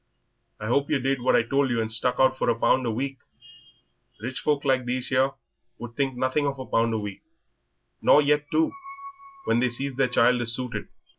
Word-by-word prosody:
I 105 Hz, -, -6 dB
hope 140 Hz, +5 st, +1 dB
yer 150 Hz, -, +2 dB
did 135 Hz, 0 st, -1 dB
what 130 Hz, -, +3 dB
I -, -, +4 dB
told 135 Hz, +3 st, +1 dB
you 120 Hz, -1 st, 0 dB
and 110 Hz, 0 st, -2 dB
stuck 125 Hz, +2 st, +1 dB
out 130 Hz, 0 st, +4 dB
for -, -, -1 dB
a 115 Hz, -, +1 dB
pound 130 Hz, +1 st, +2 dB
a -, -, +1 dB
week. 135 Hz, +3 st, -4 dB, 1.0 s
Rich 125 Hz, +4 st, -5 dB
folk 145 Hz, -1 st, 0 dB
like 130 Hz, -2 st, +2 dB
these 125 Hz, +1 st, -1 dB
here 130 Hz, +1 st, +2 dB, 0.4 s
would 120 Hz, -1 st, -9 dB
think 135 Hz, -2 st, -1 dB
nothing 130 Hz, +3 st, 0 dB
of 140 Hz, -1 st, -3 dB
a 130 Hz, -, -6 dB
pound 115 Hz, -1 st, +1 dB
a -, -, 0 dB
week, 105 Hz, -2 st, -6 dB, 0.8 s
nor -, -, +6 dB
yet 150 Hz, 0 st, +2 dB
two, 160 Hz, 0 st, +2 dB, 0.7 s
when -, -, +2 dB
they 125 Hz, +1 st, +2 dB
sees 135 Hz, +3 st, -3 dB
their 135 Hz, 0 st, +1 dB
child 125 Hz, 0 st, +3 dB
is 120 Hz, 0 st, 0 dB
suited." 125 Hz, -2 st, -5 dB
130 Hz, 210 wpm, -25 LUFS, 120-135 Hz, 1.0 s, nor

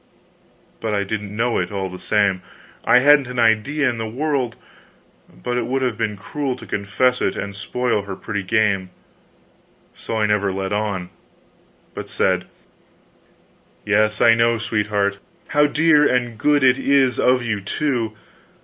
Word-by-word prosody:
But 110 Hz, -2 st, -2 dB
I 100 Hz, -, 0 dB
didn't 105 Hz, 0 st, -5 dB
know 115 Hz, +2 st, 0 dB
it, 90 Hz, +1 st, -3 dB
all 95 Hz, -2 st, -3 dB
the 90 Hz, 0 st, -9 dB
same. 100 Hz, -3 st, +1 dB, 0.4 s
I -, -, +6 dB
hadn't 145 Hz, -3 st, +6 dB
an 125 Hz, +1 st, -7 dB
idea 120 Hz, +6 st, +2 dB
in 120 Hz, -2 st, -1 dB
the 110 Hz, -1 st, -3 dB
world; 130 Hz, -1 st, -1 dB, 0.7 s
but 120 Hz, -, -4 dB
it 115 Hz, -, -3 dB
would 130 Hz, +1 st, -1 dB
have 125 Hz, -3 st, 0 dB
been 110 Hz, -2 st, -2 dB
cruel 135 Hz, +5 st, -3 dB
to -, -, -12 dB
confess 105 Hz, +6 st, 0 dB
it -, -, 0 dB
and 100 Hz, 0 st, -5 dB
spoil 115 Hz, +2 st, -1 dB
her 100 Hz, -1 st, -7 dB
pretty 100 Hz, 0 st, -4 dB
game; 100 Hz, -2 st, +1 dB, 1.0 s
so -, -, -6 dB
I 110 Hz, -, +2 dB
never 105 Hz, -2 st, +1 dB
let 95 Hz, +1 st, -3 dB
on, 100 Hz, -4 st, -2 dB, 0.8 s
but -, -, -7 dB
said: -, -, 0 dB, 1.4 s
"Yes, 105 Hz, +1 st, +2 dB
I 115 Hz, -, +7 dB
know, 115 Hz, 0 st, +2 dB
sweetheart 105 Hz, -2 st, -1 dB, 0.3 s
how 150 Hz, 0 st, +4 dB
dear 150 Hz, 0 st, +4 dB
and 120 Hz, -2 st, 0 dB
good 145 Hz, +5 st, +2 dB
it 130 Hz, 0 st, +4 dB
is 135 Hz, -2 st, +2 dB
of 125 Hz, 0 st, +3 dB
you, 110 Hz, -4 st, -2 dB
too! 120 Hz, +1 st, -2 dB
115 Hz, 160 wpm, -21 LUFS, 100-125 Hz, 1.4 s, I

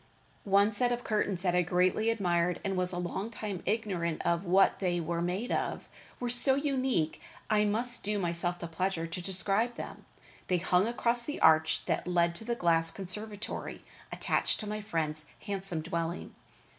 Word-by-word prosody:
One 200 Hz, +2 st, +5 dB
set 245 Hz, +4 st, +2 dB
of 245 Hz, 0 st, -2 dB
curtains 205 Hz, -4 st, 0 dB
that 180 Hz, -2 st, +2 dB
I 180 Hz, -, +4 dB
greatly 180 Hz, +5 st, +2 dB
admired, 180 Hz, -5 st, +1 dB
and 195 Hz, -1 st, -1 dB
was 180 Hz, 0 st, +1 dB
a 175 Hz, -, -2 dB
long 180 Hz, +4 st, -3 dB
time 210 Hz, -5 st, -5 dB
ignorant 190 Hz, -6 st, -1 dB
of 170 Hz, +2 st, +1 dB
what 190 Hz, +2 st, +4 dB
they 175 Hz, -2 st, 0 dB
were 170 Hz, +1 st, -2 dB
made 185 Hz, +8 st, -2 dB
of, -, -, -2 dB, 0.3 s
were 245 Hz, -, -2 dB
so 255 Hz, +2 st, +3 dB
unique, 265 Hz, -, 0 dB, 0.3 s
I 210 Hz, 0 st, +4 dB
must 235 Hz, +4 st, 0 dB
do 210 Hz, +1 st, 0 dB
myself 175 Hz, -1 st, -1 dB
the 170 Hz, -, -6 dB
pleasure 165 Hz, 0 st, -1 dB
to 165 Hz, +2 st, -5 dB
describe 195 Hz, +6 st, 0 dB
them. -, -, -8 dB, 0.4 s
They 180 Hz, -, +2 dB
hung 180 Hz, +3 st, +2 dB
across 240 Hz, 0 st, +1 dB
the 295 Hz, +5 st, -4 dB
arch 160 Hz, 0 st, +4 dB
that -, -, -1 dB
led 170 Hz, -1 st, +2 dB
to -, -, -8 dB
the 235 Hz, +1 st, -1 dB
glass 165 Hz, -5 st, +2 dB
conservatory 205 Hz, +4 st, -6 dB, 0.3 s
attached -, -, +1 dB
to 215 Hz, -, -5 dB
my 215 Hz, +1 st, -3 dB
friend's 155 Hz, -6 st, -2 dB
handsome 195 Hz, -5 st, -2 dB
dwelling. 170 Hz, +1 st, -3 dB
190 Hz, 175 wpm, -31 LUFS, 170-215 Hz, 0.4 s, One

